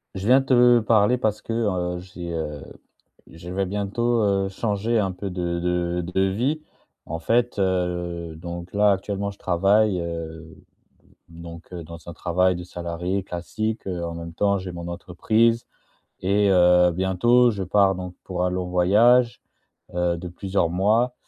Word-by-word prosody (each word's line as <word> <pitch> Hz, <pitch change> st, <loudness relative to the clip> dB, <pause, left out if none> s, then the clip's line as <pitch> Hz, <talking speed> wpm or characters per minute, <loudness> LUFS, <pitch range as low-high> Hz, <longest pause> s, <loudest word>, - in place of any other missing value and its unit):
Je 95 Hz, +3 st, -4 dB
viens 130 Hz, +2 st, +6 dB
te 125 Hz, -2 st, +5 dB
parler 110 Hz, +2 st, +3 dB
parce 110 Hz, -3 st, -1 dB
que, 115 Hz, -, -5 dB
heu, 90 Hz, -6 st, -1 dB
j'ai, 90 Hz, -2 st, -8 dB
heu 75 Hz, -3 st, -4 dB, 0.7 s
je 85 Hz, +2 st, -11 dB
vais 95 Hz, +2 st, -1 dB
bientôt, 105 Hz, +5 st, 0 dB
heu, 100 Hz, -1 st, +1 dB
changer 105 Hz, +3 st, -1 dB
un 95 Hz, -3 st, 0 dB
peu 100 Hz, +2 st, -5 dB
de 85 Hz, -1 st, -2 dB
de 90 Hz, 0 st, -1 dB
de 90 Hz, +2 st, -1 dB
vie. 120 Hz, +11 st, 0 dB, 0.4 s
En 80 Hz, +1 st, -5 dB
fait, 120 Hz, +7 st, +1 dB
heu, 90 Hz, -3 st, -1 dB
donc 85 Hz, +2 st, -8 dB
là, 105 Hz, 0 st, +4 dB
actuellement, 100 Hz, +1 st, -2 dB
je 100 Hz, -, -17 dB
travaille, 100 Hz, +2 st, +2 dB
heu, 80 Hz, -1 st, -7 dB, 0.7 s
donc, 85 Hz, +1 st, -11 dB
heu, 85 Hz, -2 st, -6 dB
dans 85 Hz, +1 st, -11 dB
un -, -, -5 dB
travail 90 Hz, +2 st, +1 dB
de 90 Hz, -, -7 dB
salarié 90 Hz, +2 st, -3 dB
classique, 110 Hz, +6 st, -4 dB
heu, 90 Hz, -3 st, -3 dB
en 85 Hz, 0 st, -4 dB
même 85 Hz, 0 st, -7 dB
temps 100 Hz, +3 st, +1 dB
j'ai 95 Hz, -1 st, -6 dB
mon 85 Hz, 0 st, -7 dB
entreprise 110 Hz, +7 st, +1 dB, 0.6 s
et 100 Hz, +2 st, +2 dB
heu, 90 Hz, -1 st, +5 dB
bientôt 95 Hz, +8 st, +3 dB
je 100 Hz, -4 st, -3 dB
pars 95 Hz, +1 st, +3 dB
donc 90 Hz, 0 st, -6 dB
pour 90 Hz, -1 st, -2 dB
un 90 Hz, -, 0 dB
long 90 Hz, 0 st, -2 dB
voyage, 115 Hz, +7 st, +4 dB, 0.5 s
heu, 90 Hz, -1 st, +1 dB
de 90 Hz, +1 st, -7 dB
plusieurs 95 Hz, -1 st, -1 dB
mois 110 Hz, +8 st, +2 dB
95 Hz, 165 wpm, -23 LUFS, 85-105 Hz, 0.7 s, viens